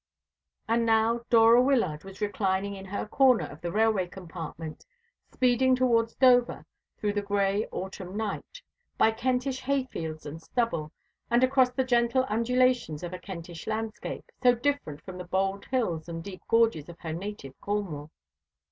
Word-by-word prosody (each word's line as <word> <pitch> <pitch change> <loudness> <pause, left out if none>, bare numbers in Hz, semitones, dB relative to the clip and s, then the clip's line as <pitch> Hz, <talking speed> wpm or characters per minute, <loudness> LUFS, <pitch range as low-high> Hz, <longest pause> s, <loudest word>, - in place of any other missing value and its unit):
And 230 +1 +2
now 225 +1 +2
Dora 230 +1 +7
Wyllard 230 - +1
was 195 0 -11
reclining 200 -1 0
in 190 0 -9
her 195 +1 -4
corner 260 +1 +4
of - - -11
the 170 - -3
railway 215 -3 +2
compartment, 165 -3 -8 0.5
speeding 255 +1 +3
towards 230 -3 +2
Dover 250 -2 +4 0.3
through 205 -1 -1
the 205 - 0
gray 200 +1 0
autumn 190 0 -6
night, 220 - -5 0.3
by 220 - +5
Kentish 255 +3 -1
hayfields 255 - -3
and 155 +2 -7
stubble, 165 -7 -1 0.4
and 240 +2 +3
across 260 -1 +4
the 260 +1 -1
gentle 245 +1 +2
undulations 235 -7 +1
of 175 0 -5
a 180 - -5
Kentish 175 -3 -8
landscape, 220 +1 -4
so 245 -1 +5
different 240 - -2
from 185 -1 -8
the - - -4
bold 195 +2 -1
hills 175 -11 -1
and 165 0 -5
deep 190 -1 -9
gorges 225 -10 +2
of 170 - -10
her 160 -2 -4
native 180 -6 -6
Cornwall. 185 -8 -3
210 Hz, 155 wpm, -28 LUFS, 180-245 Hz, 0.5 s, Dora